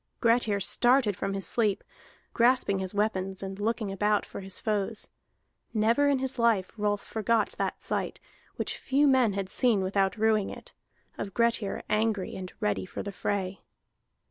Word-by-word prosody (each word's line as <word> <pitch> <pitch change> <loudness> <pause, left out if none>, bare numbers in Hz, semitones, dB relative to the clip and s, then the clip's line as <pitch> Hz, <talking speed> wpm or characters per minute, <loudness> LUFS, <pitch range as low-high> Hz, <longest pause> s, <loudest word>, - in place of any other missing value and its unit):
Grettir 230 -3 +3
started 240 +1 +3
from 195 +2 -3
his 195 -2 -2
sleep, 215 -2 0 0.5
grasping 235 -5 +3
his 190 +1 -3
weapons 195 -2 -1
and 195 0 -6
looking 220 -1 -1
about 205 +1 +1
for - - -8
his 195 -1 -3
foes. 215 0 -2 0.7
Never 230 +7 +3
in 280 - +3
his 265 -1 -2
life 225 -6 +2
Rolf 205 -1 -1
forgot 220 0 +1
that - - -2
sight, - - -2 0.4
which - - -3
few 285 +2 +2
men 255 -6 +4
had 195 -1 -2
seen 225 0 +2
without 195 +2 +1
ruing 215 -2 +2
it, - - -10 0.5
of 195 -2 -5
Grettir 230 -3 +1
angry 215 -3 0
and 185 -1 -6
ready 95 -3 -1
for - - -6
the 200 - -5
fray. 195 -1 -3
210 Hz, 160 wpm, -28 LUFS, 195-230 Hz, 0.7 s, men